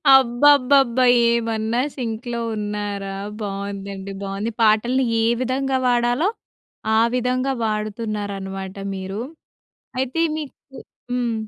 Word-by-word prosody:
అబ్బబ్బబ్బా! 260 Hz, 0 st, +5 dB, 0.3 s
ఏమన్నా 230 Hz, 0 st, 0 dB
సింక్‌లో 235 Hz, -1 st, -4 dB, 0.2 s
ఉన్నారా! 205 Hz, -2 st, -3 dB, 0.3 s
బాగుందండి, 200 Hz, -1 st, -5 dB
బాగుంది. 195 Hz, +3 st, -3 dB
పాటల్ని 235 Hz, +4 st, +3 dB, 0.2 s
ఏ -, -, +2 dB, 0.2 s
విధంగా 265 Hz, +1 st, 0 dB
వాడాలో, 245 Hz, -, +2 dB, 0.7 s
ఆ -, -, +6 dB, 0.2 s
విధంగా 255 Hz, +2 st, 0 dB
వాడుతున్నారనమాట 205 Hz, -3 st, -3 dB, 0.2 s
మీరు. 190 Hz, +3 st, -5 dB, 0.8 s
అయితే, 265 Hz, +5 st, 0 dB, 0.2 s
మీకు 295 Hz, -3 st, -6 dB, 0.6 s
హ్మ్. 245 Hz, -2 st, 0 dB
230 Hz, 90 wpm, -22 LUFS, 200-255 Hz, 0.8 s, ఆ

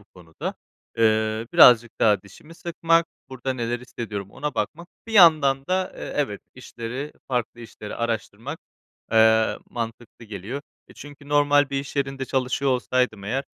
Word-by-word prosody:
bu 105 Hz, -, -21 dB
konuda. 85 Hz, -3 st, -7 dB, 0.4 s
Eee, 110 Hz, 0 st, +2 dB
birazcık 120 Hz, -1 st, +7 dB
daha 105 Hz, -4 st, +4 dB
dişimi 155 Hz, -, -15 dB
sıkmak, 165 Hz, 0 st, +1 dB, 0.2 s
burada 130 Hz, 0 st, -4 dB
neler 120 Hz, -1 st, -3 dB
hissediyorum 105 Hz, -5 st, -6 dB
ona 150 Hz, 0 st, -4 dB
bakmak. 170 Hz, +3 st, -3 dB, 0.2 s
Bir 225 Hz, -, -8 dB
yandan 150 Hz, -8 st, +6 dB
da, 185 Hz, 0 st, -1 dB
eee, -, -, -6 dB
evet 135 Hz, -9 st, -1 dB
işleri, 130 Hz, +3 st, -7 dB, 0.2 s
farklı 120 Hz, -2 st, -2 dB
işleri 110 Hz, -2 st, -9 dB
araştırmak, 115 Hz, +4 st, -4 dB, 0.5 s
eee, 110 Hz, 0 st, +4 dB
mantıklı 115 Hz, 0 st, -6 dB
geliyor. 110 Hz, +7 st, -6 dB, 0.3 s
E, -, -, -16 dB
çünkü 145 Hz, 0 st, -12 dB
normal 145 Hz, -1 st, +3 dB
bir 135 Hz, 0 st, -1 dB
iş 140 Hz, +1 st, -10 dB
yerinde 135 Hz, -1 st, -1 dB
çalışıyor 130 Hz, +1 st, 0 dB
olsaydım 125 Hz, -4 st, 0 dB
eğer 135 Hz, +6 st, -2 dB
125 Hz, 145 wpm, -24 LUFS, 110-145 Hz, 0.5 s, birazcık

